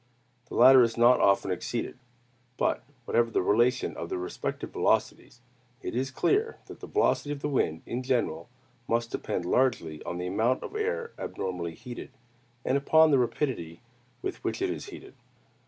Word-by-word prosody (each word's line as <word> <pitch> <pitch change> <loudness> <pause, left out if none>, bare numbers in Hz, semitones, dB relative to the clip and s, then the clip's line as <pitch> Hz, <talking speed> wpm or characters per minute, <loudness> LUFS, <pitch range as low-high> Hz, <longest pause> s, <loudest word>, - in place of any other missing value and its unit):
The - - -8
latter 130 +2 +8
is 115 -1 +1
not 120 +1 +6
often 100 -1 +3
exceeded. 115 +7 -3 0.6
But - - +1 0.2
whatever 115 0 +2
the 110 - 0
relation 120 +6 +2
of - - -6
the - - -2
respective 90 0 -4
velocities, 120 - 0 0.4
it - - -4
is 130 +2 0
clear 410 - +1
that - - -11
the - - -9
velocity 145 - +1
of 145 -1 -5
the - - +1
wind 80 - 0
in 120 - -3
general 120 -10 -1 0.4
must 115 0 0
depend 90 - -3
largely 90 -9 +1
on 85 - -4
the 90 - -4
amount 110 +8 +1
of - - -7
air 465 +2 -2
abnormally 85 -3 -4
heated, 120 +6 -8 0.6
and 140 - +2
upon 160 +2 +5
the 135 - +5
rapidity 115 - -2 0.4
with 385 -1 -4
which - - -2
it 380 -1 0
is - - -6
heated. 390 +1 -11
120 Hz, 170 wpm, -28 LUFS, 95-140 Hz, 0.6 s, latter